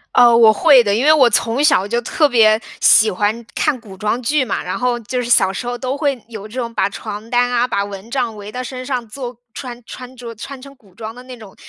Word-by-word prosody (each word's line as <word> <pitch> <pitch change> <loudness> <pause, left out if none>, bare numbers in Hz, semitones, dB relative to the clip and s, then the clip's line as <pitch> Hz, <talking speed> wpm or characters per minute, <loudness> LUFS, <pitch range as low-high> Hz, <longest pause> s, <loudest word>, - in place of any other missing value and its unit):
呃， 240 -1 +6
我 230 -2 +7
会 270 +1 +5
的。 200 -2 0
因 235 +6 0
为 310 - +7
我 270 -6 +5
从 230 +4 0
小 275 - +3
就 235 +3 -1
特 300 +5 +1
别 220 -4 +4 0.2
喜 215 +1 +6
欢 210 +4 -2
看 300 -5 0
古 210 -5 -13
装 210 +5 -2
剧 285 +3 +1
嘛， 235 - -3
然 180 - -4
后 250 -1 -1
就 245 +2 -3
是 240 - -6
小 190 -5 +3
时 215 - -5
候 245 0 -3
都 260 +1 -3
会 280 -5 -1
有 220 -3 -9
这 235 +4 -7
种 235 -2 -4
把 195 - 0
床 210 +2 -8
单 245 0 +2
啊、 245 0 +1
把 200 -4 -1
蚊 200 +2 -10
帐 245 -4 -2
围 205 0 -9
到 250 - -5
身 255 0 -7
上 250 -3 -3
做 245 +1 -8 0.2
穿 245 -2 -8
穿 250 +2 -10
着 235 -1 -8
穿 270 +5 -9
成 275 +1 -12
古 200 -7 -24
装 220 -1 -7
的 250 - -12
那 255 -1 -11
种 215 -4 -14
240 Hz, 270 characters per minute, -18 LUFS, 215-255 Hz, 0.2 s, 我